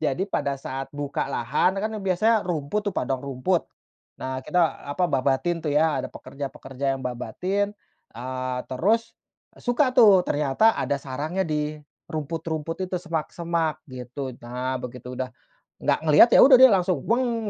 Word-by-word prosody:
Jadi 155 +5 0
pada 140 -6 -1
saat 135 0 -5
buka 145 -1 -3
lahan 140 +9 +1
kan 215 +2 -1
biasanya 200 +4 +2
rumput 165 +3 -1
tuh - - -13
padang 130 -1 -1
rumput, 140 +7 0 0.6
nah 130 0 -3
kita, 155 +4 0
eee, 165 - +3 0.2
apa 180 +4 0
babatin 135 +6 +1
tuh 150 - 0
ya 155 +2 +2
ada - - -5
pekerja-pekerja 135 -1 -5
yang 130 - -9
babatin, 180 - -2 0.4
eee, 130 +1 -4
terus, 215 - 0 0.5
suka 255 +1 +1
tuh 205 -6 +8
ternyata 150 +10 +3
ada 140 - 0
sarangnya 150 +8 -3
di 150 0 -2 0.3
rumput-rumput 160 +1 -4
itu 185 - -2
semak-semak 165 -1 -2
gitu. 130 +1 -6
Nah 125 +2 -3
begitu 125 0 -7
udah 130 0 -3 0.6
nggak - - +2
ngeliat, 155 +9 +8
ya - - +8
udah 270 -1 +9
dia 260 -1 +10
langsung 185 -2 +2
langsung 230 -2 0
155 Hz, 150 wpm, -25 LUFS, 135-185 Hz, 0.6 s, dia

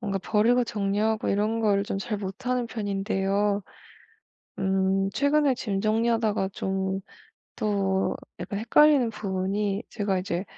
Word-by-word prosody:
뭔가 200 -3 -2
버리고 230 +5 +3
정리하고 210 +1 0
이런 215 +3 +1
걸 205 -3 +2
좀 200 0 -3
잘 210 +1 -3
못하는 240 +6 -2
편인데요. 200 -1 -1 1.0
음 190 0 +1
최근에 285 +2 +2
짐 200 -5 -2
정리하다가 220 -2 +1
좀 190 0 -2 0.6
또 195 -2 0 0.2
약간 200 - -4
헷갈리는 260 +1 +4
부분이 200 +1 -2
제가 200 -4 -1
이제 180 -1 -2
205 Hz, 260 characters per minute, -26 LUFS, 195-225 Hz, 1.0 s, 헷갈리는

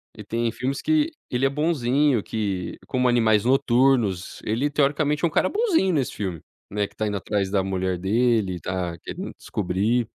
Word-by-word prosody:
Ele 105 - -9
tem 115 +1 -1
filmes 130 +3 -3
que 315 0 +2 0.2
ele 125 +2 +1
é - - +4
bonzinho, 140 -4 +1
que 100 -5 -3
como 125 -1 +1
Animais 110 -3 +3
Noturnos, 125 -7 +2
ele 120 +7 0
teoricamente 150 +2 +1
é - - +6
um 165 - 0
cara - - +2
bonzinho 360 - +2
nesse 135 -5 0
filme, 95 -6 -4 0.3
né, 100 0 0
que - - -20
está 110 0 -2
indo 105 - -1
atrás 100 0 -1
da 95 -1 +2
mulher 95 -1 -1
dele, 105 -2 +1
tá 90 -1 -3
querendo - - -7
descobrir 105 +5 0
115 Hz, 175 wpm, -24 LUFS, 100-135 Hz, 0.3 s, é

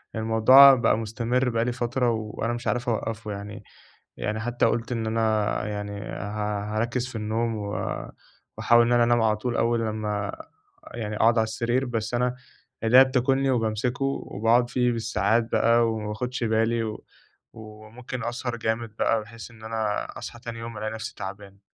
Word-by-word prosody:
الموضوع 115 +5 +7
بقى 120 -3 +2
مستمر 120 +3 -1
بقى 115 -1 0
لي 125 - 0
فترة 120 +1 0
وأنا 110 +1 -3
مش 120 +1 -5
عارف 120 0 0
أوقّفه 110 -1 -3
يعني، 100 0 -7 0.5
يعني 110 +1 -2
حتى 120 +2 0
قُلت 115 +1 0
إن 115 -2 -2
أنا 110 -2 +1
يعني 105 -1 -4
ها 105 0 -4
هاركِّز 120 +2 -1
في 130 - -10
النوم 110 +1 -1
و 100 -1 -4 0.8
وأحاول 120 0 +5
إن 120 - +2
أنا 120 -1 +5
أنام 120 0 +3
على 110 -1 +3
طول 120 +2 -2
أول 115 0 +2
لمّا 105 -2 -2 0.6
يعني 105 -3 -4
أقعد 115 +2 +4
على 110 - +4
السرير 120 +4 -1
بس 115 -1 -3
أنا 125 +1 0 0.5
إيديّا 125 +4 +8
بتاكلني 135 +1 +1
وبامسكه 120 +2 -1
وباقعد 120 -2 +1
فيه 125 -1 +1
بالساعات 115 0 0
بقى 115 0 +3
وما 110 -1 -4
باخدش 125 +4 -3
بالي 115 +1 +1
و 110 -1 -5 0.5
وممكن 110 +4 -9
أسهر 120 +1 -3
جامد 110 -1 -3
بقى 115 - +2
بحيث 115 +2 -11
إن 110 -1 -15
أنا 110 -2 -2
أصحى 120 - -8
تاني 115 -1 -7
يوم 115 -1 -7
ألاقي 110 +1 -3
نفسي 110 -1 -6
تعبان. 100 0 -8
115 Hz, 165 wpm, -25 LUFS, 110-120 Hz, 0.8 s, إيديّا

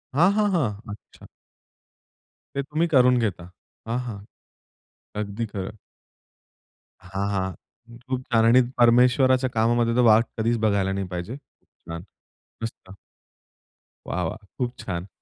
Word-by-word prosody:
हां, 175 +7 +5
हां, 210 -1 +2
हां. 110 - -1
अच्छा. 105 - -15 1.3
ते 140 - +1
तुम्ही 155 +4 0
करून 125 -4 +5
घेता. 90 -6 -2 0.4
हां, 120 +2 -1
हां. 105 -4 -6 1.0
अगदी 105 +3 -3
खरं. 100 0 -6 1.3
हां, 95 +2 -3
हां. 95 -1 -1 0.6
खूप 130 -1 -1
छान 115 -1 +4
आणि 125 +3 +6 0.2
परमेश्वराच्या 125 +2 +4
कामामध्ये 115 +1 +2
तर 125 - +4
वाट 115 +2 +5
कधीचं 115 +1 +1
बघायला 100 -3 +2
नाही 95 -1 -2
पाहिजे. 90 +7 -5
छान, 85 -11 -12 0.6
मस्त. 115 -4 -7 1.2
वाह, 90 - -2
वाह! 80 - -3 0.2
खूप 125 -1 -2
छान. 90 0 -4
115 Hz, 120 wpm, -24 LUFS, 100-125 Hz, 1.3 s, आणि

